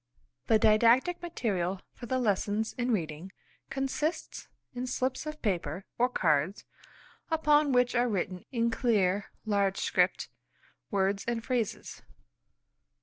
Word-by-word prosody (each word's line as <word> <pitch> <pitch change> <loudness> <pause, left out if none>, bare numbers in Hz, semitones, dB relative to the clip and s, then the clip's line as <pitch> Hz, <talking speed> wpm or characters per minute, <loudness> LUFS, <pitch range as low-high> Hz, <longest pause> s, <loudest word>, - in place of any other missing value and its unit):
The 220 - +5
Didactic 230 +10 +4
Material 195 - -2
for 240 - -9
the 260 - 0
lessons 215 -1 0
in 245 0 -1
reading 170 -4 -2 0.4
consists 275 +4 -3 0.3
in 250 +1 -4
slips 255 +3 -2
of 305 0 -5
paper 180 - -2
or 245 +1 +4
cards 165 - +1 0.7
upon 300 -3 +3
which 250 -1 +3
are 245 0 +2
written 185 -3 -2
in 235 -2 +1
clear, 205 -5 +1 0.2
large 200 -2 +1
script, - - +1 0.6
words 195 -1 0
and 235 -1 -2
phrases. 240 -5 -2
230 Hz, 120 wpm, -30 LUFS, 195-255 Hz, 0.7 s, The